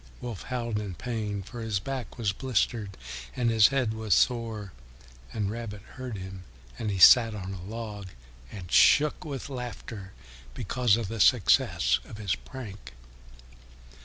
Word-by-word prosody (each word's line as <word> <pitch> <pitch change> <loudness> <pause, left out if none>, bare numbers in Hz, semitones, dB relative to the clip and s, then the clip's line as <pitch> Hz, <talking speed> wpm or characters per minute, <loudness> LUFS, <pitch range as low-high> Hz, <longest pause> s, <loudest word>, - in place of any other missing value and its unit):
Wolf 120 -5 -6
howled 120 -4 -3
with 100 -5 -6
pain, 105 -4 -3
for 120 +5 -8
his 110 -4 -1
back 130 +3 -5
was 105 -5 0
blistered 115 -4 -1 0.4
and 120 -2 +1
his 110 -2 +7
head 130 -5 0
was 110 -4 +1
sore, 115 -5 0 0.6
and 105 -2 -2
Rabbit 110 -3 -6
heard 125 -4 -6
him, 95 0 -8 0.4
and 110 - -2
he 100 - -1
sat 115 +3 +8
on 95 -1 -5
a 95 - -7
log 105 0 -6 0.4
and 90 -5 -9
shook 150 0 +5
with 140 -3 -5
laughter 120 -7 -7 0.4
because 115 +1 +2
of 115 -4 -3
the 115 +2 -5
success 90 - +4
of 105 - -10
his 100 -3 -1
prank. 105 - -10
110 Hz, 150 wpm, -28 LUFS, 100-120 Hz, 0.6 s, sat